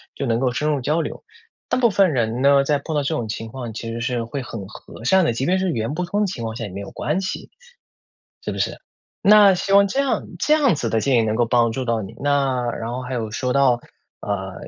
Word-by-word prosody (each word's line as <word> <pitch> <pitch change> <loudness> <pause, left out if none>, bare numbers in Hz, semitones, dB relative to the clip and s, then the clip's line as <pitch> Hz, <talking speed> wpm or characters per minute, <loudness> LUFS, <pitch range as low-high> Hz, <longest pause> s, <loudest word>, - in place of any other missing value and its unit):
就 140 - -3
能 115 -2 +1
够 130 -1 +1
深 150 +6 0
入 145 -2 +1
交 150 +6 0
流。 - - -6 0.4
大 - - 0
部 245 -2 +4
分 190 -4 +3
人 120 -1 0
呢， 140 0 +5
在 145 +1 +1
碰 155 +2 -5
到 145 - +1
这 140 - -1
种 120 -7 -2
情 110 +1 -5
况 120 -2 -7
其 115 +1 -5
实 115 - -4
是 120 0 -1
会 125 +5 -5
很 115 -5 -7
和 110 - -12
善 190 +8 +4
的， 140 - +1
即 130 +4 -2
便 185 +4 +2
是 190 0 0
语 - - -3
言 115 +5 -2
不 180 +2 -2
通 205 +4 -1
的 - - +3
情 155 - -5
况 110 0 -4
下 115 - -5
也 105 - -5
没 95 - -6
有 100 - -7
关 155 +7 -2
系， 185 - -5 0.9
是 - - -3
不 - - -6
是？ - - -2 0.4
那 205 -1 +7
希 195 +2 -1
望 200 0 +6
这 270 - -2
样 275 -1 0
这 305 - +4
样 285 -5 +3
子 125 -7 -2
的 110 0 +1
建 130 +1 +2
议 - - +4
能 110 -1 0
够 120 +1 +2
帮 115 -1 +2
助 130 +3 -3
到 115 -2 0
你。 95 - -9
那 140 -2 +1
然 115 0 -5
后 125 +1 -4
还 125 +1 -5
有 115 -3 -2
说 125 +4 -2
到， 135 -3 +3 0.4
呃， 95 -2 -3
130 Hz, 290 characters per minute, -21 LUFS, 115-160 Hz, 0.9 s, 那